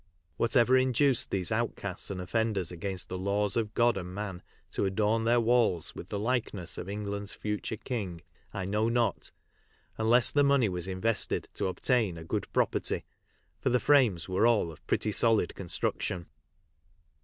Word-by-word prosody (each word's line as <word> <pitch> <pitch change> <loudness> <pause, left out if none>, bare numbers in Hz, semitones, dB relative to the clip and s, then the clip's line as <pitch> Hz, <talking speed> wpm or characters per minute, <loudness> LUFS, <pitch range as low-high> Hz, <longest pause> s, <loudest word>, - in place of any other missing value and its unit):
What 115 - -1
ever 125 +1 +5
induced 130 0 +3
these 95 -3 -1
outcasts 110 -4 -2
and 95 -2 -4
offenders 100 -1 -1
against 95 +2 -4
the 90 - -5
laws 100 +1 0
of 110 -2 -1
God 120 -2 +3
and 90 -1 -6
man 100 -3 -5 0.3
to - - -1
adorn 105 +3 +1
their 120 +1 +4
walls 115 -8 +3
with 90 - -9
the 105 - -3
likeness 105 -6 -2
of 95 - -6
England's 100 0 -3
future 105 +1 -3
king 100 -8 -4 0.3
I 95 -2 -4
know 105 +4 +1
not, 115 -4 0 0.7
unless 115 +2 +4
the 145 - +3
money 140 -5 +3
was 90 -1 -3
invested 100 +4 0
to - - -1
obtain 100 0 0
"a 80 - -8
good 80 - -3
property," - - 0 0.6
for - - 0
the 125 0 +3
frames 120 - +3
were 95 +5 +3
all 105 -8 +2
of 80 - -15
pretty 105 - +1
solid 110 -3 +3
construction. 90 -1 -2
105 Hz, 165 wpm, -29 LUFS, 95-115 Hz, 0.7 s, ever